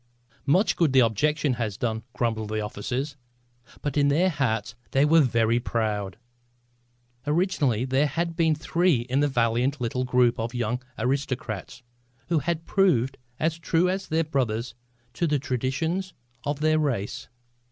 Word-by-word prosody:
"Much 185 +8 +3
good 160 -6 +2
the 130 - +6
objecting 140 +5 +2
has 110 -4 -3
done!" 110 -2 -1
grumbled 110 -3 -1
the 110 0 -1
officers. 125 +7 -3 0.7
But 145 0 -2
in 140 -1 +4
their 170 +6 +3
hearts 120 -6 -1 0.2
they 135 +2 +4
were 160 +2 +6
very 115 -3 +2
proud. 105 -5 -2 1.1
Originally 150 - +1
there 135 +3 +2
had 170 +3 -2
been 160 -2 +3
three 165 -2 +2
in 130 +3 -1
this 145 0 +3
valiant 120 +3 +1
little 125 +1 -1
group 125 -2 +2
of 115 +2 -3
young 120 +1 -1 0.2
aristocrats 125 -4 -3 0.5
who 170 -2 +3
have 165 +1 -2
proved 135 - +2 0.2
as 160 +1 0
true 170 +2 +2
as 190 +1 -2
their 160 +1 +1
brothers 125 -7 -1 0.4
to 170 - 0
the 150 -1 +2
traditions 150 +8 -2 0.3
of 145 0 -2
their 155 0 +3
race. 125 -10 -2
135 Hz, 150 wpm, -26 LUFS, 115-155 Hz, 1.1 s, the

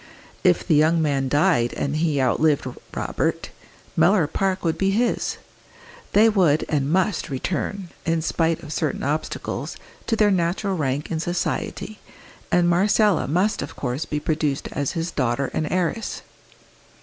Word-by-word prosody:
If - - +3
the 170 - +3
young 155 +3 +4
man 140 -4 +1
died 145 -5 +2
and 140 +1 -2
he 155 -3 +1
outlived 140 +3 +2 0.3
Robert, - - -2 0.4
Mellor 170 +1 +4
Park 190 +4 -1
would 165 - +1
be 195 - +1
his; 230 +5 0 0.8
they 215 +2 +6
would 180 -9 +3
and 145 -1 0
must 185 0 +1
return, 180 +7 -3
in 165 -1 0
spite 165 0 0
of 155 0 -6
certain 155 -2 -2
obstacles, 150 +3 -3 0.3
to 225 - +2
their 210 -2 +4
natural 185 +2 0
rank 145 -1 -2
in 160 - -1
society, 175 +4 -3 0.5
and 175 -1 +4
Marcella 200 +1 +3
must 185 +8 +1
of - - -6
course 125 +3 -3
be 150 - -2
produced 150 -2 -1
as 145 -2 -2
his 165 +1 -2
daughter 130 -1 -1
and 155 - -2
heiress. 185 +4 -1
165 Hz, 150 wpm, -23 LUFS, 145-190 Hz, 0.8 s, they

